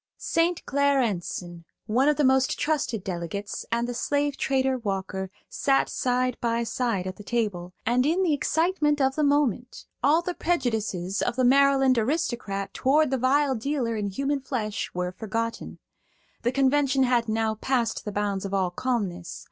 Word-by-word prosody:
St. 335 +1 0
Clair 280 0 +2
Enson, 175 -6 -3 0.2
one 245 +6 +3
of 300 - +3
the 300 - +2
most 265 0 +3
trusted 280 -9 -1
delegates, 185 +3 -5
and 235 +1 0
the 245 - -3
slave 285 +3 0
trader 265 -1 0
Walker 190 -3 -3 0.2
sat 275 -1 +1
side 250 -1 0
by 235 0 0
side 230 -5 -1
at 185 0 -5
the 210 - -10
table, 195 -6 -2
and 245 +2 +3
in 335 +7 +2
the 335 -4 +2
excitement 300 0 +1
of 265 -1 +2
the 305 - 0
moment 280 -4 0 0.2
all 315 +4 +3
the 360 - -2
prejudices 220 - -1
of - - 0
the 255 0 +2
Maryland 270 -1 +4
aristocrat 225 - -2
toward 290 +2 +2
the 265 - 0
vile 275 +2 +3
dealer 250 -1 -1
in 210 -2 -2
human 275 +8 -1
flesh 225 -6 -3
were 180 0 -1
forgotten. 225 +4 -4 0.6
The 240 - +1
convention 275 0 +2
had 240 -3 +2
now 220 0 +1
passed 235 +1 -1
the 210 - -4
bounds 200 -1 -1
of 195 0 -3
all 185 -2 +1
calmness. 190 -6 -3
245 Hz, 165 wpm, -26 LUFS, 210-275 Hz, 0.6 s, Maryland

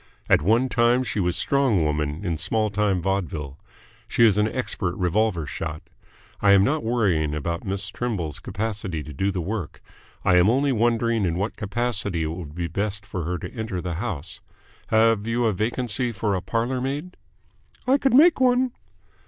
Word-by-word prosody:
At - - +4
one 115 - +3
time 120 +1 +3
she 115 - -3
was 90 -2 +1
a - - -2
Strong 135 -11 +2
Woman 75 +3 -1
in 85 -3 0
small 110 +6 -1
time 100 -4 +1
vaudeville. 80 -8 -2 0.5
She 115 - +4
is 105 -2 +4
an 105 - +3
expert 105 -7 -2
revolver 90 -2 +1
shot. 75 +3 -5 0.6
I 100 -1 +6
am 100 -1 +6
not 150 +8 +1
worrying 95 -11 +1
about 85 +3 -3
Miss 95 0 -2
Trimble's 100 - -3
capacity 100 -7 -4
to 75 +1 -9
do 95 +9 0
the 90 -3 -3
work. 95 -3 -4 0.5
I 90 -2 +5
am 90 +3 +5
only 135 +4 +2
wondering 115 -1 +1
in 85 -3 0
what 100 +5 -2
capacity 100 -5 -2
it 80 - -2
would 80 -3 -7
be 85 0 -2
best 100 +5 -3
for 95 -5 -4
her 90 +2 -2
to - - -8
enter 110 -5 -4
the 90 0 -3
house. 95 -7 -4 0.5
Have 110 -1 +3
you 120 +1 +1
a 110 - +2
vacancy 120 +4 -1
for 105 -1 -1
a 95 - -1
parlour 120 +5 -1
maid?" 145 +7 -4 0.7
"I 265 +3 +3
could 270 -3 +2
make 310 +1 +6
one." 250 0 +3
105 Hz, 185 wpm, -24 LUFS, 90-120 Hz, 0.7 s, I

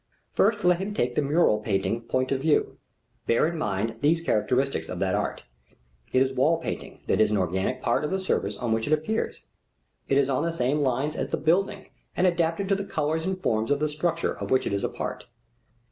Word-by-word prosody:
First 210 +1 +2
let 180 -1 +4
him 200 +2 -4
take 120 -7 0
the 150 - +1
mural 145 -6 +3
painting 105 +1 -1
point 130 +3 -1
of 135 -1 0
view. 155 +1 +1 0.5
Bear 115 - +3
in 170 +2 -1
mind 110 -5 -2
these 155 +3 +3
characteristics 135 -2 0
of - - -4
that - - 0
art: - - -2 0.7
it 130 - +4
is 135 0 -2
wall 150 +6 +3
painting 165 - -6
that - - +2
is 110 - +4
an 105 - +1
organic 95 +7 -1
part 120 - +1
of 150 - -1
the 190 - -1
surface 105 - -1
on 120 -2 -2
which 110 0 -1
it 155 - +2
appears: 155 +9 -1 0.6
it 135 - +3
is 140 -1 +3
on 135 -1 0
the 170 0 -1
same 140 0 +1
lines 140 +2 0
as - - -2
the - - -1
building 195 +5 0 0.3
and 180 - +3
adapted 170 +1 +1
to 195 - +4
the 200 - -3
colors 160 -2 -1
and 190 0 -3
forms 110 +2 +1
of 145 0 +2
the 155 - +1
structure 165 +2 -1
of - - -6
which 130 - +2
it - - -1
is 100 - -1
a - - 0
part. - - -5
145 Hz, 220 wpm, -26 LUFS, 120-170 Hz, 0.7 s, let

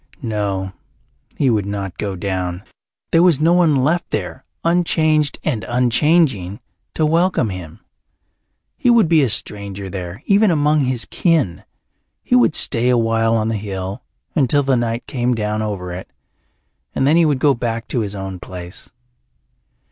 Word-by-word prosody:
No, 100 -4 -2 0.6
he 135 -3 +2
would 105 -3 0
not 100 -3 -5
go 100 -2 -3
down. 90 -1 -3 0.5
There 165 - +5
was 175 -6 +4
no 165 +3 +3
one 170 -4 +4
left 170 +5 0
there, - - -4 0.2
unchanged 160 -3 +2
and 120 -10 -1
unchanging, 125 - +2 0.4
to 155 - +2
welcome 165 - +1
him. 90 -4 -9 1.0
He 245 - +2
would 235 -6 +5
be 160 -1 +4
a 135 - +2
stranger 100 -2 -2
there, 95 - -7
even 205 +1 +4
among 150 -2 +2
his 125 -2 -1
kin. 155 - 0 0.6
He 250 - +1
would 245 -10 +4
stay 120 -1 +2
awhile 115 -1 +2
on 110 0 0
the 115 - -1
hill, 95 +2 -5 0.3
until 145 0 +2
the 135 -1 +2
night 120 -1 -2
came 125 -2 -1
down 105 -1 -2
over 100 -4 -4
it, 90 +1 -8 0.9
and 135 - +1
then 150 +3 +4
he 170 - +5
would 145 -3 +2
go 140 +1 +3
back 115 -2 -3
to 125 - -1
his 105 -2 -3
own 95 -2 -6
place. 90 0 -9
120 Hz, 155 wpm, -19 LUFS, 100-155 Hz, 1.0 s, There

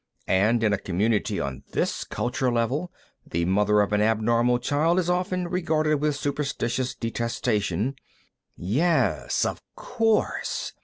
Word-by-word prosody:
And 110 +5 +2
in 105 -2 +3
a 100 - 0
community 105 +4 0
on 65 -1 -4
this - - -1
culture 125 +1 -1
level, 130 +9 -1 0.3
the 85 0 -2
mother 105 +3 +3
of 105 0 0
an 105 - +3
abnormal 115 +3 +2
child 150 +7 +1
is 180 -1 +1
often 180 0 -1
regarded 155 -4 +1
with 150 0 0
superstitious 135 -3 -2
detestation 115 0 -1 0.4
" - - -52 0.3
"Yes, 175 -2 +1
of - - -3
course!" 225 -3 -1
120 Hz, 135 wpm, -25 LUFS, 105-155 Hz, 0.4 s, in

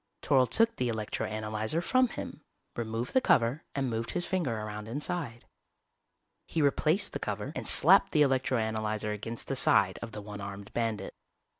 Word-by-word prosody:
Toryl 130 -3 +3
took 230 0 +3
the 125 - 0
electro 110 -2 -3
analyzer 110 +6 -2
from 255 +9 +2
him, - - -7 0.3
removed 115 +1 -4
the 260 - +4
cover 125 - +2
and 135 -2 0
moved 115 -1 -3
his 175 0 0
finger 165 -13 -1
around 105 0 -6
inside. 145 -1 -4 1.0
He 165 - -2
replaced 155 +5 +2
the - - -3
cover - - -4
and - - -4
slapped - - +6
the 150 -2 +4
electro 130 -2 +1
analyzer 110 -1 -1
against 110 +2 -5
the - - -2
side - - +3
of 115 - -6
the 105 - -7
one 105 0 -8
armed 100 0 -8
bandit. 110 -4 -2
115 Hz, 170 wpm, -29 LUFS, 110-145 Hz, 1.0 s, slapped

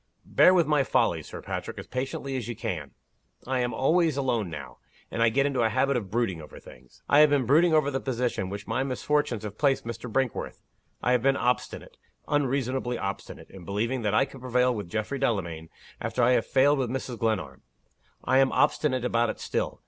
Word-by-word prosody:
"Bear - - +5
with 180 -3 +4
my 150 -2 +2
folly, - - +1
Sir - - -9
Patrick, - - -5
as - - -7
patiently 135 +1 -4
as 125 -5 -3
you 120 - -4
can! 85 -9 -5 0.5
I 130 0 -1
am 120 0 0
always 155 +5 +2
alone 120 -8 0
now; 70 -6 -8 0.3
and 115 - -2
I 115 - +5
get 135 +5 +2
into 135 -3 0
a 110 - +3
habit 135 +5 +1
of 110 -6 -3
brooding 105 -7 -1
over 75 - -12
things. 60 0 -17
I 145 - +5
have 150 0 +7
been 140 -3 +2
brooding 160 +7 +4
over 150 -2 +2
the 135 - -1
position 125 -6 -2
in - - -6
which 100 +1 -6
my 115 +3 -1
misfortunes 135 -3 -1
have 105 0 -7
placed 140 -4 +2
Mr. 115 +1 -6
Brinkworth. 130 0 -2 0.4
I 125 - +2
have 125 -2 +3
been 135 +2 +3
obstinate 125 -1 -2 0.3
unreasonably 130 -3 0
obstinate 100 0 -6
in 95 -2 -11
believing 115 +7 -2
that 105 -1 0
I 135 - +4
could 135 -1 -13
prevail 125 0 +2
with 105 -6 -6
Geoffrey 110 +8 -3
Delamayn, 85 -11 -2 0.3
after 125 - -1
I 120 - +5
had 115 -3 +2
failed 140 +2 +3
with 125 -3 -1
Mrs. 125 -1 -4
Glenarm. 90 - -2 0.6
I 130 +1 +3
am 135 -1 +4
obstinate 135 -4 +1
about 120 -1 +1
it - - -5
still. - - -3
125 Hz, 210 wpm, -27 LUFS, 110-135 Hz, 0.6 s, have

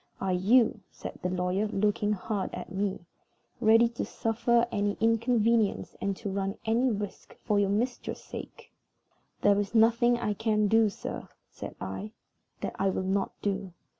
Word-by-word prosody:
Are 190 -1 0
you," 215 +4 +3
said - - -9
the 180 - -1
lawyer, 180 +3 0
looking 210 0 +1
hard 205 0 -2
at - - -7
me, 190 -2 -2 0.5
"ready 225 +1 +6
to 235 - -4
suffer 235 +1 +1
any 205 -1 0
inconvenience 230 -1 +2
and 195 -1 -1
to 205 -3 -4
run 195 +1 -2
any 235 +4 +2
risk 205 -3 -5
for 205 -1 +2
your 200 -1 +2
mistress's 235 +5 -2
sake?" - - -9 0.7
"There 205 0 +5
is 205 +2 -3
nothing 235 +2 +5
I 210 -3 -1
can 215 0 +1
do, 220 +1 +4
sir," 200 - -7 0.2
said - - -8
I, 195 - -5 0.5
"that - - -3
I 195 - +2
will 190 - -1
not 195 +1 0
do. 195 -2 -2
210 Hz, 160 wpm, -29 LUFS, 195-225 Hz, 0.7 s, ready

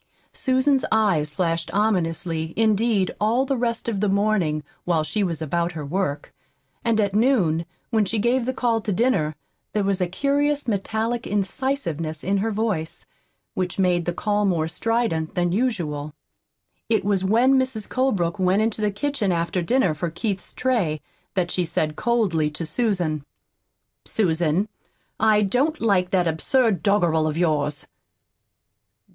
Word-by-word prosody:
Susan's 260 0 +2
eyes 195 -9 +2
flashed 165 0 -1
ominously, 165 -5 0
indeed, 220 -2 +2
all 235 +5 +2
the 275 0 0
rest 235 -2 -2
of 220 -4 -1
the 210 0 +1
morning, 195 -7 +1 0.2
while 165 -3 +1
she 205 +6 -1
was 165 -4 -2
about 170 +3 -1
her 155 -2 -5
work; 150 -2 -2 0.5
and 230 -2 +2
at 200 -2 +1
noon, 195 - +2 0.2
when 220 -2 +3
she 215 +3 -1
gave 240 +3 +1
the - - +2
call 235 -3 0
to 210 - -3
dinner, 180 - +1 0.4
there 210 - +1
was 195 -1 0
a 180 - +2
curious 285 +7 0
metallic 225 +3 -1
incisiveness 195 - -2
in 195 +2 +1
her 215 +3 0
voice, 210 -7 -2 0.5
which 180 -1 -2
made 180 -3 +2
the 175 - 0
call 210 +4 0
more 170 -5 +1
strident 175 -3 -1
than 175 -1 +1
usual. 170 - -2 0.7
It 215 -4 +1
was 200 -2 +1
when 245 +7 +4
Mrs. 255 -5 -1
Colebrook 205 -10 0
went 190 +3 +3
into 220 -1 -1
the 210 - +2
kitchen 210 -1 -1
after 170 +1 0
dinner 215 -1 +2
for 165 +3 -3
Keith's 190 +2 -3
tray 215 -13 0 0.4
that 175 -2 0
she 180 - +1
said 155 -2 -1
coldly 200 -10 +1
to 150 +2 -5
Susan: 175 - -1 0.8
"Susan, 175 -1 +1 0.5
I 215 -1 +4
don't 270 +10 +1
like 195 -5 +2
that 180 -2 +2
absurd 195 - +1
doggerel 175 -6 +2
of 155 0 -2
yours." 150 -4 0
195 Hz, 150 wpm, -23 LUFS, 165-225 Hz, 0.8 s, when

